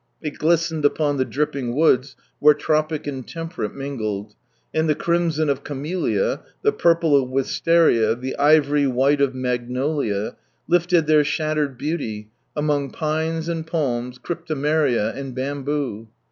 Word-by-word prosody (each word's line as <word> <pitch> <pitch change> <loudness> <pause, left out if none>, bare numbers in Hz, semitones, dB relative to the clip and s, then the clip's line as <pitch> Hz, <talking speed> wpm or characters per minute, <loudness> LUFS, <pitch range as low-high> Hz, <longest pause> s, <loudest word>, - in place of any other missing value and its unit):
It 150 -2 -6
glistened 165 -1 +1
upon 145 0 +2
the 130 - +1
dripping 140 -4 -2
woods, 135 -4 +3 0.2
where 150 0 +6
Tropic 155 +1 0
and 135 -3 -4
T'emperate 165 - -5
mingled, 110 -7 -4 0.4
and 160 0 +1
the 150 - +3
crimson 170 -2 0
of 140 -1 -1
camellia, 175 - -1 0.2
the 430 - +4
purple 165 - +3
of 135 -2 +2
wisteria, 135 -3 +3
the 130 +2 -5
ivory 145 -1 +4
white 135 +3 +2
of 135 -2 +1
magnolia, 125 -3 -2 0.3
lifted 175 -1 +3
their 155 -1 +5
shattered 150 -2 -1
beauty, 110 -9 -4 0.2
among 145 -2 0
pines 160 +2 -2
and 165 -2 -3
palms, 125 -6 -2
cryptomeria, 150 -6 0
and 135 -2 -6
bamboo. 135 -4 -3
145 Hz, 130 wpm, -22 LUFS, 130-160 Hz, 0.4 s, where